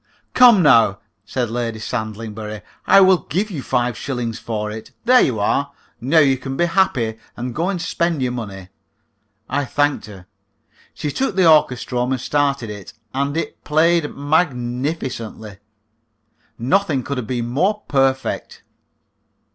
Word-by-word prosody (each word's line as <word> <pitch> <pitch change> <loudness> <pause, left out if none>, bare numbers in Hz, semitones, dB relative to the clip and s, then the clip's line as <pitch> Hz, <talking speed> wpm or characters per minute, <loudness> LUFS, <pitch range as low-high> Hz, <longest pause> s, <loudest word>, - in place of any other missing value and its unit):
"Come, 240 -7 +7
now," 115 -8 +5 0.3
said 120 -4 -2
Lady 115 -1 -2
Sandlingbury, 110 -2 -5 0.2
"I 195 - +7
will 185 -2 +5
give 195 - -1
you 155 -7 -4
five 120 -1 0
shillings 120 -3 -4
for 105 -2 -4
it. 110 +1 -8 0.2
There 250 +1 +6
you 120 -5 +1
are! 140 +7 0 0.3
Now 135 +7 +1
you 135 -4 +4
can 135 0 -5
be 175 - +3
happy, 160 - +1 0.2
and 125 0 -4
go 170 +8 -1
and 195 -3 -2
spend 170 -1 -1
your 130 -1 0
money." 100 -6 -7 0.8
I 145 - -1
thanked 145 -1 0
her. 95 -4 -12 0.7
She 150 - -3
took 265 - -1
the 185 -3 +4
orchestrome 125 -4 +2
and 130 - -2
started 140 -4 0
it, 105 -2 -10 0.2
and 140 +3 -1
it 165 - -4
played 160 0 +2
magnificently. 125 - -2 1.0
Nothing 140 +1 +1
could 140 0 -3
have 115 - -6
been 120 -1 -2
more 195 - 0
perfect. 135 -1 -1
130 Hz, 145 wpm, -20 LUFS, 115-160 Hz, 1.0 s, Come